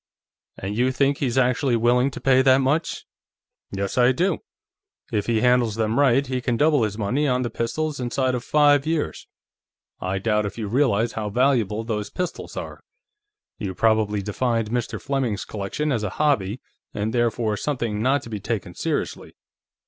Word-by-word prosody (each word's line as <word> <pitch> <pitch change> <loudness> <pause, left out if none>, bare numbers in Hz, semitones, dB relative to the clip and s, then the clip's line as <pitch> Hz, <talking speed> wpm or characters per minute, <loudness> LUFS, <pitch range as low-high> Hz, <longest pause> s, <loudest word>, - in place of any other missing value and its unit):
"And 100 +2 -4
you 125 +3 +2
think 140 +1 +1
he's 130 -2 -1
actually 125 0 +2
willing 120 +3 +3
to - - -8
pay 130 -1 +4
that 130 -1 +5
much?" 140 +5 0 0.6
"Yes, 100 +4 -2
I 125 +1 +6
do. 180 +9 0 0.7
If 105 -3 -1
he 115 -2 +1
handles 125 -3 +3
them 115 +2 0
right, 135 -1 +4
he 130 -1 -2
can 120 -1 0
double 150 -1 +3
his 105 -2 -1
money 125 +8 0
on 125 -1 +1
the 120 - -3
pistols 150 +5 -2
inside 130 +1 0
of 125 -1 -2
five 145 0 +4
years. 160 -2 -2 0.7
I 95 +1 -2
doubt 105 +1 +1
if 100 - -8
you 110 -3 -3
realize 115 -1 +2
how 105 -1 -3
valuable 115 -3 +1
those 105 -2 -3
pistols 180 -2 -5
are. - - -6 0.8
You 95 -3 -4
probably 110 -2 +2
defined 115 +1 -1
Mr. 120 -1 -2
Fleming's 135 -7 -2
collection 110 +9 -3
as 120 -5 0
a 105 - -2
'hobby' 125 -5 0 0.3
and 105 +2 -2
therefore 115 -2 +1
something 115 -5 -2
not 135 +4 +2
to - - -10
be 105 - -3
taken 100 -4 -4
seriously. - - -3
120 Hz, 170 wpm, -23 LUFS, 105-135 Hz, 0.8 s, I